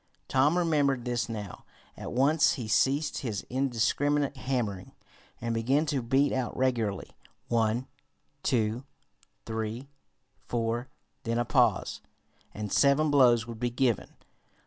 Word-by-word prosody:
Tom 145 +6 +3
remembered 145 -7 +1
this 120 -2 -1
now. 105 -4 -6 0.3
At - - -7
once 145 +5 +3
he 120 -4 -5
ceased 140 +7 +1
his 110 -7 -4
indiscriminate 140 +3 +1
hammering, 120 -8 -3 0.5
and 115 0 -2
began 130 +7 +1
to 140 -3 -1
beat 135 +4 +2
out 130 -2 -2
regularly 115 -7 -1 0.4
one, 115 +1 +1 0.6
two, 115 -1 0 0.6
three, 110 +4 -4 0.6
four 120 +1 -1 0.3
then 115 -3 -2
a 120 - +1
pause, - - +1 0.5
and 105 -1 -5
seven 145 +2 +4
blows 120 -5 +5
would 115 -2 -8
be 120 - 0
given. 120 -3 0
125 Hz, 125 wpm, -28 LUFS, 115-140 Hz, 0.6 s, blows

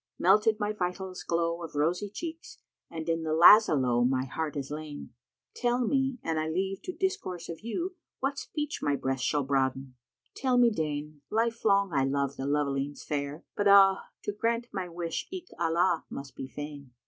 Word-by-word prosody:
Melted 210 +4 +4
my 210 0 0
vitals 185 -1 -4
glow 170 0 -1
of 165 -3 -8
rosy 170 +7 0
cheeks 330 - -7 0.2
* - - -62
And 160 -1 -6
in 165 0 0
the 160 -1 -1
Lazá 175 -1 +8
lowe 120 -2 +2
my 130 +1 +1
heart 155 +2 -4
is 140 0 -4
lain: 150 -3 -7 0.4
Tell 245 0 +1
me, 270 +1 +1
an 160 -1 -1
I 155 0 -1
leave 190 +4 -2
to - - -3
discourse 380 - -3
of 165 - -6
you, 345 - -4
* - - -64
What 275 +1 -1
speech 300 -1 -4
my 145 - +1
breast 135 -2 -2
shall 145 +3 +1
broaden? 135 -1 0 0.4
Tell 260 -2 +1
me 240 -1 +6
deign! 150 -4 -3
Life 230 +1 0
long 200 -3 +3
I 135 - +3
loved 140 0 -1
the 135 - -3
lovelings 140 -1 -1
fair, 145 +1 -4
but 205 - +1
ah, 195 -1 +6
* - - -60
To - - -1
grant 230 +3 -1
my 185 -3 -3
wish 170 -1 -4
eke 365 -1 -8
Allah 170 +1 +2
must 140 -1 -8
be 135 - -6
fain!" 145 -1 -8
170 Hz, 195 wpm, -29 LUFS, 145-215 Hz, 0.4 s, Lazá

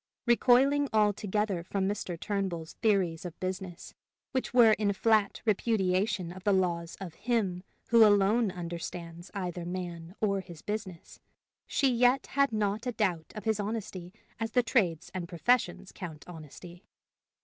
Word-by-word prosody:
Recoiling 260 +4 +4
altogether 210 -3 +1
from 190 +2 -1
Mr. 190 -4 -3
Turnbull's 185 -6 -3
theories 190 -7 +2
of 175 -2 -8
business, 185 -1 -5 0.4
which 260 -1 -2
were 240 -3 +7
in 210 -1 +2
flat 215 0 +2
repudiation 200 -3 +1
of 185 +1 -10
the 205 - +3
laws 170 -3 0
of 185 -4 -7
Him 205 -4 -1 0.3
who 230 -1 +7
alone 210 +2 +4
understands 170 0 -6
either 180 -3 -3
man 175 -1 -6
or 200 -2 +1
his 175 -4 -12
business, 205 -5 -6 0.5
she 275 - +2
yet 245 +2 +3
had 280 -1 +3
not 215 +2 -1
a 245 - -1
doubt 180 -8 -1
of 215 - -6
his 220 -2 0
honesty 200 -4 -4 0.3
as 225 0 -3
the 250 - +4
trades 180 - 0
and 175 -2 -5
professions 185 +1 +1
count 160 -6 -9
honesty. 175 +2 -11
195 Hz, 145 wpm, -30 LUFS, 175-220 Hz, 0.5 s, were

